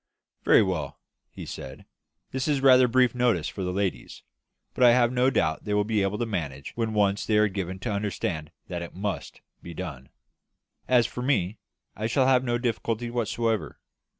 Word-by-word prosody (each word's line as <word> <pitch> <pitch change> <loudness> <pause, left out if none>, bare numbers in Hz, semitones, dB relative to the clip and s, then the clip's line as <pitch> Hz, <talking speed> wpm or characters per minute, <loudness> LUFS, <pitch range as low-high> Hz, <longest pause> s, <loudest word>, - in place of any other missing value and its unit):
"Very - - +6
well," 80 -8 -3 0.3
he - - -9
said. 65 0 -8 0.5
"That 130 +2 -2
is 145 -2 +2
rather 130 -1 +6
brief 125 0 +3
notice 120 -10 +1
for 95 - -5
the 90 - -2
ladies; 95 -10 -3 0.5
but 125 - +1
I 120 -1 +8
have 120 -1 +3
no 125 +1 +3
doubt 80 -12 0
they 105 - -1
will 105 - +3
be 105 0 0
able 100 +1 0
to 120 - -1
manage 75 - -4
when 115 -2 -2
once 100 -1 +2
they 110 - +1
are 105 0 +5
given 95 -2 -4
to 120 - -2
understand 95 -6 -3 0.2
that 90 -2 -4
it 85 - -8
must 100 +1 -4 0.2
be 85 -1 -9
done. 70 -8 -7 0.8
As 125 -2 +4
for 125 - -5
me, 110 -7 0 0.4
I 110 +2 -2
shall 130 +3 +2
have 130 -1 +4
no 120 -2 0
difficulty 120 -1 -2
whatever. 115 -1 -1
105 Hz, 185 wpm, -26 LUFS, 95-120 Hz, 0.8 s, I